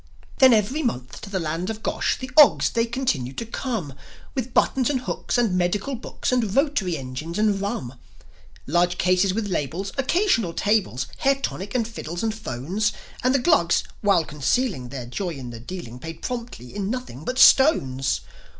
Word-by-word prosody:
Then 260 -1 +8
every 230 +7 +2
month 125 - -3
to 205 - -8
the 195 -1 -1
land 165 +3 -2
of 220 - -2
the 215 - -16
Gosh - - 0
The 260 0 -7
Ogs, 300 -2 +7
they 230 0 +1
continued 160 - -2
to 230 - -3
come, 220 - -4 0.4
With 260 -1 -3
buttons 255 +1 +2
and 265 -4 0
hooks, 255 - -2
and 230 -6 +2
medical 185 +8 0
books, 250 +1 -4
And 230 -6 +1
rotary 275 - +1
engines, 135 +6 -6
and 210 -2 +2
rum, 130 -11 -4 0.7
Large 175 +4 +1
cases 185 +2 +3
with 210 +2 -2
labels, 180 +4 -2
occasional 270 - +2
tables, 200 - +1
Hair 275 0 +3
tonic 200 +5 -4
and 230 -3 +1
fiddles 175 -6 -6
and 220 -1 0
'phones; 210 - -2 0.3
And 255 +2 +3
the - - +6
Glugs, 245 - +3 0.2
while 195 -6 +3
copncealing 150 - -1
their 125 -2 -6
joy 170 +7 -4
in 125 -3 -7
the 115 - -8
dealing, 125 -3 -8
Paid 165 +3 -8
promptly 235 - -6
in 200 -1 -2
nothing 235 - -5
but 255 +8 -3
stones. 135 - +5
200 Hz, 180 wpm, -24 LUFS, 155-245 Hz, 0.7 s, Then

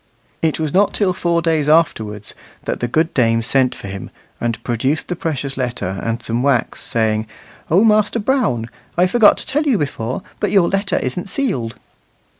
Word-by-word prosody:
It 160 -1 +1
was 155 -2 -2
not 200 +2 +3
till 195 -3 +2
four 170 -1 0
days 160 -3 +1
afterwards 110 -10 +1 0.3
that - - -3
the 120 - -1
good 160 +7 +1
dame 115 -2 +2
sent 130 +1 +2
for - - -8
him, 100 0 -6 0.3
and 115 -1 -2
produced 130 +6 -1
the 180 - -1
precious 140 -5 -3
letter 120 -7 -3
and 115 +1 -2
some 115 +1 -1
wax, 130 -3 +1
saying, 110 -1 0 0.4
"O 185 +7 +5
Master 215 0 +3
Brown, 210 - 0 0.3
I 180 - +5
forgot 215 +3 +5
to - - -7
tell 295 +3 0
you 255 -6 +3
before, 130 -6 -3 0.2
but - - 0
your 195 -4 +4
letter 195 -1 0
isn't 175 +9 -3
sealed." 135 - -2
145 Hz, 180 wpm, -19 LUFS, 115-185 Hz, 0.4 s, O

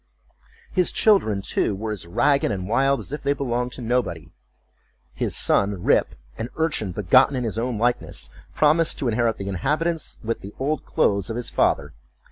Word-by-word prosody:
His 180 -2 +2
children, 110 - +3
too, 100 - 0
were 110 +2 -4
as 100 -5 -5
ragged 140 +9 +2
and 95 -2 -3
wild 135 +5 +2
as - - -6
if 150 - -4
they 140 - +1
belonged 125 -3 -2
to 125 - -7
nobody. 110 -10 -2 0.8
His - - -2
son 100 -2 +2
Rip, - - +2 0.2
an 115 - -3
urchin 155 - 0
begotten 115 +9 +4
in 125 - -1
his 110 -1 -2
own 120 -1 -2
likeness, 120 +2 -1 0.2
promised 155 +2 +3
to 135 - -2
inherit 115 0 +1
the 100 - -6
habits, 155 - -1
with 115 +1 -2
the 100 +2 -10
old 145 +4 -2
clothes 100 +1 +1
of 115 - -3
his 120 0 -4
father. 75 - +1
120 Hz, 175 wpm, -23 LUFS, 100-140 Hz, 0.8 s, begotten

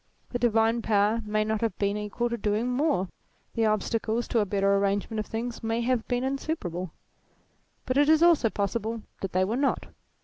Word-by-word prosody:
The 245 - -2
divine 230 0 +2
power 215 +1 +2
may 215 0 +1
not 220 0 -1
have 230 -1 -1
been 200 0 0
equal 210 +3 -2
to - - 0
doing 215 +1 0
more; 250 - +1 0.5
the 225 -1 +2
obstacles 220 +2 0
to 235 - +2
a 205 - +1
better 195 0 +1
ar 200 - +3
rangement 200 +2 0
of 215 - -3
things 230 +1 -4
may 225 +1 0
have 240 -1 0
been 245 0 0
insuperable. 265 - -3 1.0
But 255 +1 0
it 290 +1 +4
is 315 +1 +5
also 335 -9 +5
possible 215 +2 -2 0.2
that 195 - -3
they 185 +1 +3
were 215 +5 -1
not. 275 0 0
225 Hz, 195 wpm, -27 LUFS, 205-245 Hz, 1.0 s, is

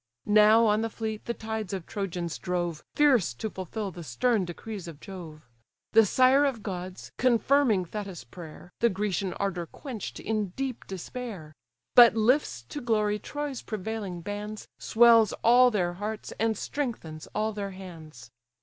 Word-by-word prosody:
Now 215 +2 +6
on 210 0 +3
the 225 - -1
fleet 220 -1 -5
the 235 - -2
tides 220 -3 -4
of 185 -4 -4
Trojans 180 -4 -4
drove, 175 -4 -2
Fierce 255 - +4
to 215 - -4
fulfil 195 +2 -5
the 175 0 -9
stern 190 - +1
decrees 190 +2 -7
of 160 -4 -9
Jove: 160 -6 -10 0.4
The 225 -1 +6
sire 260 +6 +5
of 265 -6 -1
gods, 185 -2 -6
confirming 250 -4 +3
Thetis' 195 - -6
prayer, 165 +6 -11
The 235 - +4
Grecian 195 -2 -1
ardour 180 -4 -2
quench'd 245 - -7
in 210 -4 -2
deep 265 -3 -4
despair; 190 -4 -7 0.4
But 235 -2 +9
lifts 220 - +2
to 295 - -5
glory 210 -3 +1
Troy's 290 0 -5
prevailing 210 -4 -5
bands, 205 +3 -6
Swells 230 -2 +5
all 250 +2 +7
their 180 -6 0
hearts, 210 +4 -5
and 220 -1 +1
strengthens 210 - -4
all 215 +1 0
their 200 -1 -4
hands. 160 -11 -11
210 Hz, 150 wpm, -28 LUFS, 180-225 Hz, 0.4 s, But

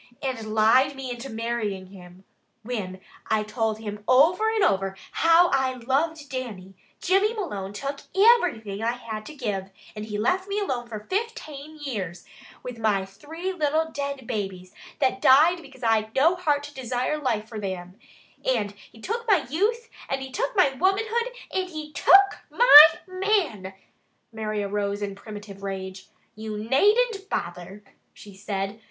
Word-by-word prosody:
"And 225 -5 -4
lied 255 +6 +4
me 265 -2 -6
into 245 +2 -7
marrying 225 -4 -3
him, 180 -1 -14 0.4
whin 205 -6 -5 0.3
I 220 -1 +1
told 215 0 -2
him 210 -1 -7
over 335 +12 +4
and 445 -2 +1
over 195 - +1
how 335 +1 +5
I 265 -1 +2
loved 285 +5 -1
Dannie. 225 -9 -6 0.3
Jimmy 395 +5 +2
Malone 205 - -4
took 275 +7 -5 0.2
iverything 350 - +3
I 230 +1 0
had 220 -3 -7
to 305 - -10
give, 205 -8 -3 0.3
and 210 0 -6
he 210 -1 -4
left 365 - 0
me 400 +1 -3
alone 255 - -3
for 215 -3 -7
fiftane 310 - -5
years, 185 -9 -5 0.4
with 250 -2 -7
my 205 -4 +1
three 320 - -6
little 320 -1 0
dead 280 -3 -4
babies, 190 -4 -5 0.2
that 260 -1 0
died 320 +7 +5
because 270 -4 -15
I'd 220 -1 +1
no 325 +7 +4
heart 295 -5 0
to 290 0 -9
desire 255 +3 -2
life 225 -6 -1
for 220 -1 -7
thim, 185 -3 -5 0.5
and 220 -6 0 0.2
he 225 - -17
took 465 - -4
my 395 -6 +3
youth, 450 +8 0 0.2
and 270 0 -2
he 265 - -8
took - - -2
my 295 -9 +4
womanhood, 435 - 0 0.2
and 375 -1 -1
he 310 -3 -7
took 395 +1 +5
my 305 -12 +10 0.2
man 370 - -1 0.3
" - - -45
Mary 215 -1 -3
arose 200 0 -2
in 200 -1 -3
primitive 205 -1 -10
rage. 190 -1 -6 0.3
"You 215 0 -6
naden't 400 - +2
bother!" 180 +4 -5 0.3
she 205 - -13
said. 195 +1 -4
250 Hz, 160 wpm, -25 LUFS, 210-325 Hz, 0.5 s, my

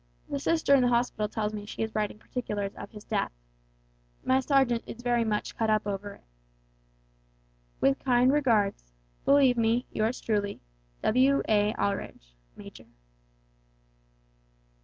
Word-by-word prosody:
The 140 - -1
sister 320 - +2
in 275 - +6
the 250 - +3
hospital 235 -3 0
tells 215 0 -2
me 210 -1 -5
she 225 - -4
is 220 - -4
writing 210 -1 -2
particulars 210 -4 -4
of - - -9
his 210 -2 -12
death. - - -1 0.9
My 260 0 +3
sergeant 265 -3 +2
is 240 - -9
very 240 -1 +2
much 210 -2 -2
cut 225 -1 0
up 215 -1 +2
over 205 0 -4
it. - - -23 1.6
"With 135 0 +2
kind 255 0 +4
regards, 215 - +1 0.3
"Believe 275 -3 +5
me, 230 +2 +2
yours 220 +3 -1
truly, 205 -2 -1 0.4
"W.A. 220 -4 +3
ALDRIDGE 125 - -3 0.2
Major." - - -12
225 Hz, 135 wpm, -28 LUFS, 205-250 Hz, 1.6 s, in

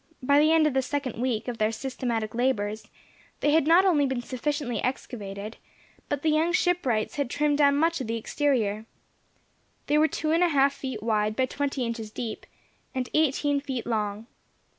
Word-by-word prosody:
By 280 +3 +4
the 305 +1 +4
end 320 -1 +5
of 305 - +1
the 265 - +2
second 260 -3 -3
week 240 -3 -1
of 240 -2 -4
their 215 +1 +2
systematic 235 -3 -3
labours 220 -4 -1 0.5
they 295 - +3
had 310 -1 +3
not 345 +4 +6
only 300 -7 +3
been 260 -2 -2
sufficiently 255 -2 -2
excavated, 210 -4 -5 0.5
but 290 -1 -2
the 315 - +3
young 320 +3 +2
shipwrights 305 - +1
had 285 -4 -1
trimmed 295 +2 +1
down 280 -1 +5
much 330 +1 +1
of 250 - -4
the 230 +1 -1
exterior. 225 -4 -1 1.0
They 300 +1 +2
were 310 - +5
two 310 0 -2
and 335 +2 +3
a 350 - +3
half 280 -2 +3
feet 260 -6 -6
wide, 215 -1 +1
by 260 - +2
twenty 275 -1 -2
inches 230 -2 -4
deep, 220 0 -6 0.5
and 255 -1 -2
eighteen 290 -1 +2
feet 265 -5 -4
long. 215 -2 -2
265 Hz, 185 wpm, -26 LUFS, 225-295 Hz, 1.0 s, not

